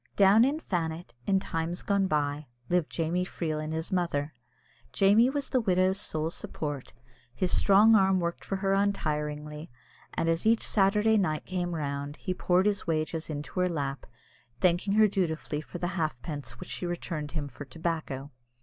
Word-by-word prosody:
Down 200 Hz, +3 st, +6 dB
in 280 Hz, +5 st, +1 dB
Fannet, 165 Hz, -, -3 dB
in 195 Hz, -1 st, +3 dB
times 165 Hz, -1 st, -3 dB
gone 200 Hz, -1 st, +2 dB
by, 145 Hz, -2 st, -1 dB, 0.2 s
lived 175 Hz, -3 st, +1 dB
Jamie 170 Hz, +2 st, 0 dB
Freel 160 Hz, -4 st, -3 dB
and 155 Hz, 0 st, -4 dB
his 160 Hz, +1 st, -3 dB
mother. 165 Hz, -5 st, -1 dB, 0.6 s
Jamie 210 Hz, +5 st, +5 dB
was 280 Hz, 0 st, -3 dB
the 255 Hz, -, +3 dB
widow's 185 Hz, -1 st, +2 dB
sole 160 Hz, -4 st, -1 dB
support; 145 Hz, -5 st, -5 dB, 0.4 s
his 180 Hz, +7 st, +1 dB
strong 210 Hz, +3 st, +6 dB
arm 190 Hz, -3 st, +4 dB
worked 170 Hz, -1 st, -3 dB
for 195 Hz, -, -3 dB
her 195 Hz, 0 st, 0 dB
untiringly, 150 Hz, -6 st, -1 dB, 0.5 s
and 165 Hz, -, 0 dB
as 165 Hz, 0 st, +1 dB
each 225 Hz, 0 st, +3 dB
Saturday 210 Hz, +2 st, +3 dB
night 155 Hz, -5 st, -1 dB
came 175 Hz, -2 st, -2 dB
round, 145 Hz, -1 st, -3 dB
he 185 Hz, -, -3 dB
poured 180 Hz, +1 st, +2 dB
his 205 Hz, -3 st, 0 dB
wages 160 Hz, 0 st, -1 dB
into 150 Hz, +4 st, -4 dB
her 180 Hz, 0 st, +2 dB
lap, 140 Hz, -5 st, -3 dB, 0.5 s
thanking 180 Hz, +2 st, +2 dB
her 215 Hz, 0 st, +6 dB
dutifully 160 Hz, -6 st, -2 dB
for 175 Hz, -, -8 dB
the 175 Hz, 0 st, -2 dB
halfpence 155 Hz, -4 st, -4 dB
which 180 Hz, -, -9 dB
she 180 Hz, -, -3 dB
returned 165 Hz, -3 st, -4 dB
him 150 Hz, -3 st, -2 dB
for 145 Hz, -, -9 dB
tobacco. 150 Hz, -2 st, -4 dB
170 Hz, 170 wpm, -29 LUFS, 155-195 Hz, 0.6 s, Down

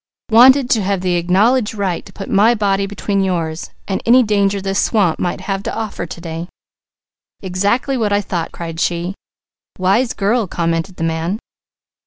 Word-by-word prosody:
"Wanted 255 Hz, +3 st, +7 dB
to 225 Hz, -, +3 dB
have 195 Hz, -1 st, -1 dB
the 180 Hz, -1 st, 0 dB
acknowledged 205 Hz, +7 st, +2 dB
right 190 Hz, -4 st, -2 dB
to -, -, -13 dB
put 195 Hz, 0 st, -8 dB
my 215 Hz, +4 st, +4 dB
body 200 Hz, -2 st, 0 dB
between 200 Hz, 0 st, -2 dB
yours 170 Hz, -4 st, -2 dB, 0.2 s
and 195 Hz, -, -2 dB
any 250 Hz, +2 st, +5 dB
danger 200 Hz, -2 st, +1 dB
this 195 Hz, 0 st, 0 dB
swamp 195 Hz, -8 st, +1 dB
might 175 Hz, -, -2 dB
have 195 Hz, -1 st, -3 dB
to -, -, -4 dB
offer 215 Hz, -6 st, -4 dB
to 170 Hz, -, -8 dB
day." 165 Hz, 0 st, -6 dB, 1.0 s
"Exactly 200 Hz, +9 st, 0 dB
what 215 Hz, -4 st, 0 dB
I 205 Hz, -, +3 dB
thought!" 175 Hz, -5 st, -3 dB
cried 165 Hz, -1 st, -7 dB
she. 175 Hz, +2 st, -1 dB, 0.6 s
"Wise 200 Hz, +7 st, +2 dB
girl," 210 Hz, +2 st, 0 dB
commented 170 Hz, +1 st, -2 dB
the 165 Hz, -, -5 dB
man. 165 Hz, +4 st, -1 dB
195 Hz, 170 wpm, -17 LUFS, 175-215 Hz, 1.0 s, Wanted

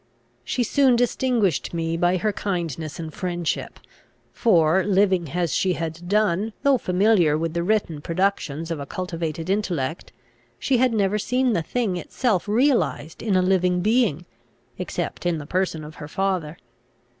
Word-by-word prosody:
She 250 Hz, -, -1 dB
soon 265 Hz, +1 st, +3 dB
distinguished 235 Hz, -, +1 dB
me 165 Hz, 0 st, -1 dB
by 175 Hz, +2 st, +2 dB
her 210 Hz, +4 st, 0 dB
kindness 165 Hz, -7 st, -3 dB
and 160 Hz, -2 st, -6 dB
friendship; 175 Hz, -5 st, -3 dB, 0.5 s
for, 175 Hz, -5 st, +3 dB
living 190 Hz, -4 st, +2 dB
as 170 Hz, -5 st, 0 dB
she 185 Hz, +6 st, +2 dB
had 165 Hz, +1 st, -5 dB
done, 210 Hz, 0 st, +1 dB
though 275 Hz, -2 st, +4 dB
familiar 180 Hz, -5 st, +3 dB
with 165 Hz, 0 st, -2 dB
the 170 Hz, -, -1 dB
written 175 Hz, -5 st, 0 dB
productions 165 Hz, -3 st, -1 dB
of 165 Hz, -, -3 dB
a 140 Hz, -, -6 dB
cultivated 165 Hz, -2 st, -4 dB
intellect, 175 Hz, -7 st, -2 dB, 0.5 s
she 260 Hz, -, +1 dB
had 255 Hz, 0 st, +3 dB
never 210 Hz, -1 st, +1 dB
seen 250 Hz, +2 st, +1 dB
the 170 Hz, -, +1 dB
thing 205 Hz, +1 st, -1 dB
itself 210 Hz, +1 st, -1 dB
realised 210 Hz, -, +1 dB
in 210 Hz, -4 st, 0 dB
a 185 Hz, -, +3 dB
living 180 Hz, -1 st, +2 dB
being, 210 Hz, -, +1 dB, 0.5 s
except -, -, -4 dB
in 175 Hz, -2 st, 0 dB
the 150 Hz, -, -7 dB
person 180 Hz, -1 st, -1 dB
of 150 Hz, +1 st, -9 dB
her 150 Hz, -, -6 dB
father. 180 Hz, -3 st, -2 dB
180 Hz, 155 wpm, -23 LUFS, 165-210 Hz, 0.5 s, though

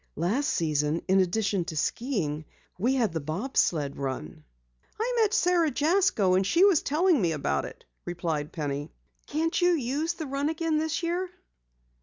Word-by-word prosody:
Last 210 Hz, -, 0 dB
season 150 Hz, 0 st, 0 dB
in 190 Hz, +1 st, +4 dB
addition 195 Hz, 0 st, +1 dB
to 165 Hz, -3 st, -6 dB
skiing 160 Hz, -, -2 dB, 0.3 s
we 250 Hz, +7 st, +2 dB
had 225 Hz, -9 st, +1 dB
the 160 Hz, -, -1 dB
bob 175 Hz, -, -5 dB
sled 145 Hz, -4 st, +1 dB
run." 130 Hz, -, -5 dB, 0.6 s
"I 480 Hz, +3 st, 0 dB
met 425 Hz, -2 st, +3 dB
Sara 355 Hz, -7 st, +3 dB
Jasko 295 Hz, -, +2 dB
and 185 Hz, +1 st, +3 dB
she 340 Hz, -, +4 dB
was 380 Hz, -7 st, +4 dB
telling 320 Hz, -, +2 dB
me 170 Hz, -3 st, +1 dB
about 135 Hz, -, -1 dB
it," -, -, -11 dB, 0.2 s
replied 165 Hz, -4 st, -3 dB
Penny. 145 Hz, -1 st, -4 dB, 0.4 s
"Can't 325 Hz, +4 st, -1 dB
you 355 Hz, 0 st, +4 dB
use 300 Hz, +3 st, -1 dB
the 325 Hz, -2 st, -6 dB
run 280 Hz, +2 st, -1 dB
again 320 Hz, -1 st, 0 dB
this 320 Hz, +2 st, -2 dB
year?" 355 Hz, +2 st, -1 dB
230 Hz, 165 wpm, -27 LUFS, -, 0.6 s, in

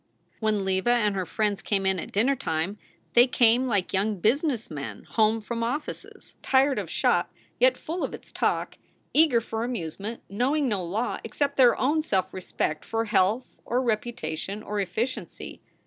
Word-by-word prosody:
When 215 Hz, -3 st, 0 dB
Leva 190 Hz, +4 st, +1 dB
and 220 Hz, -4 st, +3 dB
her 185 Hz, -2 st, -2 dB
friends 210 Hz, -2 st, -1 dB
came 195 Hz, -2 st, 0 dB
in 190 Hz, -1 st, +2 dB
at -, -, -7 dB
dinner 250 Hz, +7 st, +2 dB
time 185 Hz, -3 st, -2 dB, 0.3 s
they 240 Hz, +2 st, +7 dB
came 245 Hz, +1 st, +4 dB
like 205 Hz, -6 st, 0 dB
young 200 Hz, +1 st, +1 dB
business 240 Hz, -, +1 dB
men 140 Hz, -2 st, -6 dB
home 220 Hz, 0 st, +2 dB
from 230 Hz, +2 st, -4 dB
offices, 255 Hz, +6 st, -5 dB
tired 270 Hz, +1 st, +3 dB
of -, -, -5 dB
shop, -, -, +1 dB, 0.3 s
yet -, -, +4 dB
full 340 Hz, +3 st, -4 dB
of -, -, -2 dB
its -, -, -10 dB
talk; -, -, -1 dB, 0.3 s
eager 300 Hz, -6 st, +5 dB
for 225 Hz, 0 st, -4 dB
amusement, 220 Hz, -1 st, -5 dB
knowing 265 Hz, +8 st, +1 dB
no 205 Hz, -6 st, -1 dB
law 200 Hz, +8 st, -2 dB
except 280 Hz, +5 st, -1 dB
their 250 Hz, -3 st, +5 dB
own 300 Hz, +5 st, +2 dB
self 190 Hz, -, -1 dB
respect 180 Hz, -4 st, -3 dB
for 225 Hz, 0 st, -1 dB
health 210 Hz, +3 st, +1 dB
or 245 Hz, -, 0 dB
reputation 215 Hz, -5 st, -3 dB
or 210 Hz, -1 st, -3 dB
efficiency. 215 Hz, +7 st, -4 dB
220 Hz, 165 wpm, -26 LUFS, 195-250 Hz, 0.3 s, they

